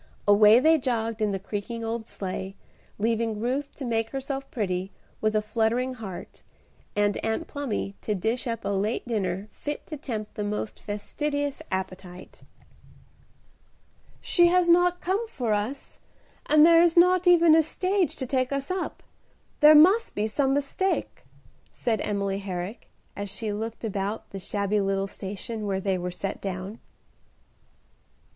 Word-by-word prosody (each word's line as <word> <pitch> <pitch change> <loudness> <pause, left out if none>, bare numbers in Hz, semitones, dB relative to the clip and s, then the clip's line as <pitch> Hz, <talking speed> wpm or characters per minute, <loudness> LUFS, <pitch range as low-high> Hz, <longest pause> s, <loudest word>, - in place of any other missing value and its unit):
Away 210 +2 +7
they 320 +3 +4
jogged 230 -3 -2
in 215 - +2
the 195 - -1
creaking 210 +4 -5
old 225 0 -3
sleigh, 190 0 -5 0.4
leaving 225 0 0
Ruth 265 +5 -2
to 275 - -6
make 225 -1 0
herself 270 +1 -4
pretty, 190 -4 -2 0.3
with 215 0 +1
a 215 - +2
fluttering 230 +4 0
heart, 205 -7 -9 0.5
and 205 0 +2
Aunt 225 +8 -1
Plumy 275 -10 -3
to 210 - -1
dish 225 +7 -1
up 230 -1 -3
a - - 0
late 200 +5 -1
dinner 195 -3 -2
fit 295 0 -6
to 305 - -7
tempt 220 -6 -5
the 210 - -4
most 210 +1 -3
fastidious 285 +8 -3
appetite. 185 -1 -6 1.8
"She 345 -1 +4
has 360 0 +3
not 355 +1 +4
come 400 +6 -1
for 245 - -2
us, 210 +7 -4 0.5
and 305 0 +7
there 335 0 +7
is 345 0 +3
not 360 +1 +5
even 340 -2 +7
a 320 - +7
stage 365 0 0
to 260 - -4
take 255 0 0
us 275 +3 -2
up. 370 0 -4 0.6
There 300 +1 +8
must 380 +10 +5
be 210 - 0
some 265 +5 +1
mistake," 290 +7 -1 0.5
said 225 -4 -1
Emily 200 -1 -1
Herrick, 190 +2 -6 0.3
as 200 0 -5
she 210 +2 -4
looked 225 +3 -5
about 205 0 -3
the 195 - -6
shabby 200 +2 -1
little 195 0 0
station 205 +2 -6
where 190 -1 0
they 190 -1 -1
were 180 0 -3
set 195 +2 -5
down. 195 +3 -5
225 Hz, 150 wpm, -26 LUFS, 200-285 Hz, 1.8 s, There